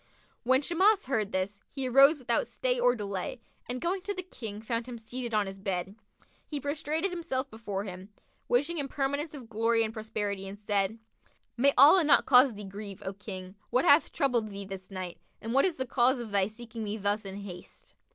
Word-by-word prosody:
When 260 Hz, +3 st, +3 dB
Shimas 380 Hz, +6 st, +3 dB
heard 220 Hz, -6 st, -1 dB
this, 195 Hz, +1 st, -2 dB
he 270 Hz, -2 st, -3 dB
arose 275 Hz, +5 st, +6 dB
without 240 Hz, -4 st, 0 dB
stay 250 Hz, +1 st, -1 dB
or 245 Hz, 0 st, +4 dB
delay 200 Hz, +1 st, -4 dB, 0.3 s
and 250 Hz, +1 st, -2 dB
going 370 Hz, +5 st, -1 dB
to 405 Hz, +2 st, -4 dB
the 370 Hz, -, -4 dB
King, 225 Hz, -, -7 dB
found 230 Hz, +2 st, -3 dB
him 245 Hz, -2 st, -6 dB
seated 240 Hz, +2 st, -5 dB
on 210 Hz, -1 st, +2 dB
his 195 Hz, 0 st, -7 dB
bed. 190 Hz, -1 st, -3 dB, 0.5 s
He 295 Hz, -, -3 dB
prostrated 310 Hz, +5 st, -1 dB
himself 290 Hz, -7 st, -3 dB
before 205 Hz, -3 st, -4 dB
him, 190 Hz, 0 st, -8 dB, 0.4 s
wishing 295 Hz, +7 st, +1 dB
him 280 Hz, -, -2 dB
permanence 285 Hz, +3 st, -2 dB
of 255 Hz, -5 st, -9 dB
glory 225 Hz, +1 st, +2 dB
and 220 Hz, 0 st, -3 dB
prosperity, 210 Hz, -3 st, -3 dB
and 195 Hz, +1 st, -8 dB
said, 205 Hz, 0 st, 0 dB, 0.6 s
"May 275 Hz, +4 st, +4 dB
Allah 305 Hz, +7 st, +8 dB
not 295 Hz, -2 st, +5 dB
cause 250 Hz, -2 st, +6 dB
thee 205 Hz, -, -8 dB
grieve, 200 Hz, 0 st, -7 dB
O 190 Hz, -, -3 dB
King! 190 Hz, -2 st, -8 dB, 0.2 s
What 255 Hz, +2 st, +2 dB
hath 285 Hz, +3 st, +6 dB
troubled 245 Hz, -7 st, +1 dB
thee 200 Hz, 0 st, -6 dB
this 190 Hz, -1 st, -8 dB
night, 185 Hz, -3 st, -6 dB, 0.2 s
and 225 Hz, +2 st, -4 dB
what 275 Hz, -, +5 dB
is 365 Hz, -4 st, 0 dB
the 260 Hz, -, -3 dB
cause 250 Hz, +1 st, +3 dB
of 230 Hz, -3 st, -6 dB
thy 195 Hz, -1 st, +3 dB
seeking 225 Hz, +1 st, -7 dB
me 210 Hz, +1 st, -3 dB
thus 205 Hz, +1 st, 0 dB
in 195 Hz, 0 st, -7 dB
haste?" 180 Hz, -3 st, -11 dB
230 Hz, 200 wpm, -29 LUFS, 200-275 Hz, 0.6 s, Allah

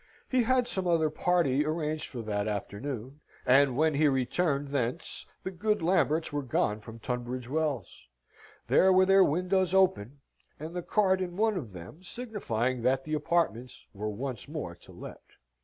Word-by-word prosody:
He 255 Hz, -1 st, +2 dB
had 250 Hz, +1 st, +2 dB
some 190 Hz, -2 st, -2 dB
other 160 Hz, -3 st, +2 dB
party 155 Hz, -4 st, +2 dB
arranged 155 Hz, 0 st, -2 dB
for, 120 Hz, -3 st, -7 dB
that 105 Hz, -1 st, -2 dB
afternoon, 120 Hz, +6 st, -5 dB, 0.3 s
and 130 Hz, 0 st, +4 dB
when 155 Hz, +1 st, +3 dB
he 150 Hz, +2 st, +3 dB
returned 140 Hz, +2 st, 0 dB
thence, 135 Hz, +2 st, -2 dB, 0.2 s
the 190 Hz, -, -4 dB
good 210 Hz, +1 st, 0 dB
Lamberts 165 Hz, -3 st, +2 dB
were 145 Hz, -, 0 dB
gone 110 Hz, -5 st, 0 dB
from 115 Hz, +2 st, -11 dB
Tunbridge 125 Hz, +1 st, -4 dB
Wells. 140 Hz, -, -3 dB, 0.6 s
There 190 Hz, -, +5 dB
were 185 Hz, 0 st, +5 dB
their 195 Hz, 0 st, +6 dB
windows 185 Hz, +3 st, +1 dB
open, 145 Hz, -, +2 dB, 0.4 s
and 160 Hz, +3 st, -7 dB
the 180 Hz, -, -2 dB
card 190 Hz, 0 st, +2 dB
in 175 Hz, -1 st, -4 dB
one 220 Hz, 0 st, +2 dB
of 130 Hz, -, -5 dB
them 90 Hz, -, -10 dB
signifying 175 Hz, -, -3 dB
that 130 Hz, +2 st, +1 dB
the 155 Hz, -, -5 dB
apartments 150 Hz, -6 st, -1 dB
were 105 Hz, +1 st, -4 dB
once 120 Hz, +2 st, -5 dB
more -, -, -5 dB
to -, -, -17 dB
let. -, -, -10 dB
150 Hz, 165 wpm, -29 LUFS, 125-180 Hz, 0.6 s, their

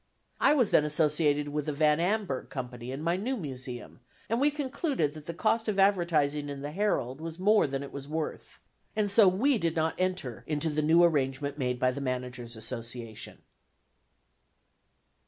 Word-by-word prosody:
I 295 Hz, -, +5 dB
was 245 Hz, -8 st, +2 dB
then -, -, +5 dB
associated 150 Hz, -1 st, +1 dB
with 150 Hz, 0 st, -3 dB
the 150 Hz, -, -1 dB
Van 150 Hz, +1 st, +3 dB
Amburgh 185 Hz, -6 st, -1 dB
Company 125 Hz, -2 st, -6 dB
in 135 Hz, +3 st, -5 dB
my 170 Hz, +2 st, +1 dB
new 250 Hz, +7 st, -2 dB
Museum, 130 Hz, -, -7 dB, 0.3 s
and 230 Hz, +3 st, +1 dB
we 290 Hz, -, +5 dB
concluded 280 Hz, -, -1 dB
that 155 Hz, -1 st, -11 dB
the 170 Hz, -, -3 dB
cost 225 Hz, +6 st, +1 dB
of 210 Hz, -2 st, -1 dB
advertising 165 Hz, -7 st, +2 dB
in 140 Hz, -1 st, -6 dB
the 145 Hz, -, -4 dB
Herald 155 Hz, -, -1 dB
was 165 Hz, 0 st, -6 dB
more 205 Hz, -1 st, +4 dB
than 135 Hz, 0 st, -3 dB
it 140 Hz, -, -8 dB
was 140 Hz, 0 st, -7 dB
worth, 155 Hz, 0 st, -5 dB, 0.3 s
and 210 Hz, -2 st, +1 dB
so 205 Hz, -1 st, +6 dB
we 225 Hz, +8 st, +3 dB
did 165 Hz, -2 st, 0 dB
not 160 Hz, 0 st, +1 dB
enter 185 Hz, -10 st, -2 dB
into 155 Hz, +1 st, 0 dB
the 150 Hz, +1 st, 0 dB
new 165 Hz, +3 st, +5 dB
arrangement 140 Hz, -2 st, +1 dB
made 125 Hz, -1 st, 0 dB
by 130 Hz, +1 st, +2 dB
the 140 Hz, -, -5 dB
Managers' 125 Hz, -2 st, -4 dB
Association. 115 Hz, 0 st, -6 dB
150 Hz, 175 wpm, -29 LUFS, 135-185 Hz, 0.3 s, so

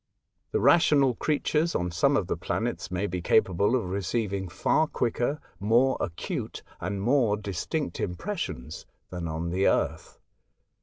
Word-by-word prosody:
The -, -, +1 dB
rational 140 Hz, 0 st, +5 dB
creatures 155 Hz, +4 st, 0 dB
on 90 Hz, 0 st, -1 dB
some 85 Hz, -, +3 dB
of -, -, 0 dB
the -, -, -1 dB
planets -, -, -3 dB
may 90 Hz, +2 st, -1 dB
be 90 Hz, -2 st, -3 dB
capable 100 Hz, +4 st, +3 dB
of 120 Hz, -, 0 dB
receiving 100 Hz, 0 st, -2 dB
far 155 Hz, -, +2 dB
quicker, 125 Hz, +3 st, -1 dB, 0.2 s
more 120 Hz, +6 st, +3 dB
acute, 85 Hz, -1 st, -4 dB, 0.2 s
and 95 Hz, +3 st, -3 dB
more 115 Hz, -1 st, +2 dB
distinct 105 Hz, -, -3 dB
impres 190 Hz, -, -3 dB
sions 65 Hz, -, -6 dB, 0.2 s
than 90 Hz, -2 st, -4 dB
on 80 Hz, +2 st, -3 dB
the 95 Hz, +2 st, +2 dB
Earth. -, -, 0 dB
100 Hz, 145 wpm, -27 LUFS, 90-135 Hz, 0.2 s, rational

